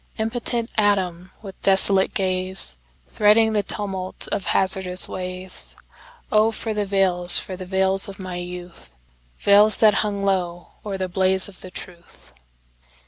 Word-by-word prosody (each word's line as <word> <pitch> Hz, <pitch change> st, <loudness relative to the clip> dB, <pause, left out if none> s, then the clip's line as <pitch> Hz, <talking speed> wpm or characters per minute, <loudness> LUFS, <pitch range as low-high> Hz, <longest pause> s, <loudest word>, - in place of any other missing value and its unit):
Impotent 230 Hz, +1 st, -4 dB
atom 185 Hz, -4 st, -1 dB
with 195 Hz, -2 st, -12 dB
desolate 195 Hz, 0 st, +3 dB
gazeThreading 185 Hz, -, -1 dB
the 210 Hz, -, 0 dB
tumult 195 Hz, -2 st, -2 dB
of 195 Hz, -, -4 dB
hazardous 190 Hz, -1 st, +2 dB
ways—Oh, 190 Hz, -, -4 dB
for 225 Hz, 0 st, -6 dB
the 210 Hz, -1 st, -3 dB
veils, 185 Hz, -3 st, +4 dB
for 185 Hz, -, -4 dB
the 185 Hz, 0 st, -10 dB
veils 190 Hz, +1 st, +3 dB
of 195 Hz, -, -10 dB
my 185 Hz, -2 st, -8 dB
youthVeils 175 Hz, -, -1 dB
that 215 Hz, -2 st, +4 dB
hung 200 Hz, -2 st, -4 dB
low 175 Hz, -3 st, -3 dB
o'er 200 Hz, -2 st, -6 dB
the 185 Hz, -1 st, -4 dB
blaze 190 Hz, +1 st, +4 dB
of 195 Hz, -2 st, -14 dB
the 185 Hz, -, -11 dB
truth! 175 Hz, -, -14 dB
190 Hz, 130 wpm, -21 LUFS, 180-205 Hz, -, veils